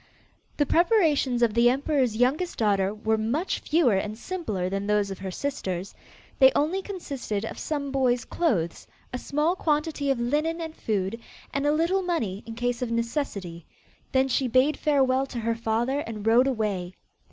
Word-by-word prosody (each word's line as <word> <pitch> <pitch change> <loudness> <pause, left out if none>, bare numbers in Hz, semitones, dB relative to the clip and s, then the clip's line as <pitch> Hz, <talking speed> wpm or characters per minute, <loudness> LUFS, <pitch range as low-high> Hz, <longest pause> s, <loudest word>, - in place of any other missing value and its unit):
The 290 - +3
preparations 310 - +3
of 230 -3 +3
the 235 +1 +5
emperor's 265 -3 +1
youngest 280 +9 +1
daughter 200 -3 +2
were 220 +1 -1
much 265 - -1
fewer 300 -8 +2
and 210 +3 -1
simpler 220 - -3
than 195 +2 -3
those 210 -1 +1
of 195 - -6
her 190 0 -5
sisters. 190 -6 -4 0.5
They 265 -1 +8
only 330 +7 +1
consisted 275 - -4
of - - -6
some 285 -3 -3
boy's 250 -2 +1
clothes, 185 - -1 0.3
a 250 - -2
small 300 +7 0
quantity 300 -3 0
of 270 -3 +1
linen 300 +7 0
and 325 -1 -5
food, 210 +1 -2 0.3
and 280 +1 0
a - - +4
little 335 +5 +2
money 235 - -2
in 225 - -6
case 245 +1 -1
of 250 - -1
necessity. 230 - -3 0.4
Then 265 0 +3
she 265 0 +1
bade 260 +5 +3
farewell 270 -3 +2
to 255 - -7
her 230 +1 0
father, 230 +4 0
and 220 -6 -6
rode 235 +4 +5
away. 205 -8 -2
250 Hz, 170 wpm, -26 LUFS, 215-295 Hz, 0.5 s, They